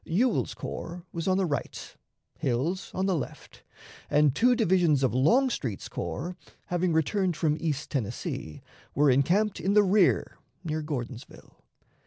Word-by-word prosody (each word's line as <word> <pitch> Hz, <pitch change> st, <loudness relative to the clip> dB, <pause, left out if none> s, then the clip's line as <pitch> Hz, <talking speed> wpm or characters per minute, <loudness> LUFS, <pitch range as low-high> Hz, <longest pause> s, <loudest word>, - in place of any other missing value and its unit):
Ewell's 225 Hz, +8 st, 0 dB
corps 170 Hz, +1 st, -6 dB
was 165 Hz, +1 st, -4 dB
on 185 Hz, 0 st, +3 dB
the 195 Hz, -, +2 dB
right, 145 Hz, -4 st, -4 dB, 0.4 s
Hill's 150 Hz, +10 st, -1 dB
on 190 Hz, -, 0 dB
the 195 Hz, -, +2 dB
left, 145 Hz, -, -7 dB, 0.5 s
and 150 Hz, -2 st, +4 dB
two 245 Hz, -, +4 dB
divisions 170 Hz, -, +3 dB
of 130 Hz, -, +2 dB
Longstreet's 145 Hz, -, +1 dB
corps, 135 Hz, -, -4 dB, 0.3 s
having 175 Hz, 0 st, 0 dB
returned 175 Hz, +2 st, +1 dB
from 150 Hz, -2 st, +1 dB
East 150 Hz, -3 st, -3 dB
Tennessee, 110 Hz, -, -4 dB, 0.3 s
were 145 Hz, 0 st, +4 dB
encamped 185 Hz, +11 st, +2 dB
in 195 Hz, -, 0 dB
the 210 Hz, -, +7 dB
rear 195 Hz, -1 st, +2 dB, 0.2 s
near 155 Hz, -2 st, -2 dB
Gordonsville. 130 Hz, -5 st, -7 dB
165 Hz, 140 wpm, -27 LUFS, 140-190 Hz, 0.5 s, the